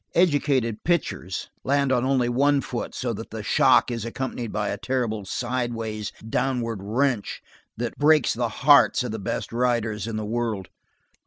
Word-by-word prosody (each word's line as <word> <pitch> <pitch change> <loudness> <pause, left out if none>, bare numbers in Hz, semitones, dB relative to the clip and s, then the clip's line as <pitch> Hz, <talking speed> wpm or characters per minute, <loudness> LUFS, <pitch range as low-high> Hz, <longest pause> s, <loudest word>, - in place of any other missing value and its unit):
Educated 140 - +2
"pitchers" 165 - -1
land 140 0 +2
on 125 -2 +2
only 130 -2 +2
one 140 +3 +3
foot, - - -5
so - - -2
that - - -7
the - - -6
shock - - +4
is 115 -2 -3
accompanied 120 -1 -4
by 105 -1 -1
a 100 - -3
terrible 115 -6 -2
sidewise, 115 -2 -3 0.2
downward 115 -3 -1
wrench 115 +2 -1 0.4
that 120 0 -4
breaks 150 -2 +4
the 120 0 -1
hearts 140 +2 +5
of 125 - -4
the 110 - -4
best 100 - -4
riders 115 -3 0
in 115 - -4
the 110 0 -3
world. 110 -4 -2
120 Hz, 160 wpm, -24 LUFS, 110-135 Hz, 0.4 s, hearts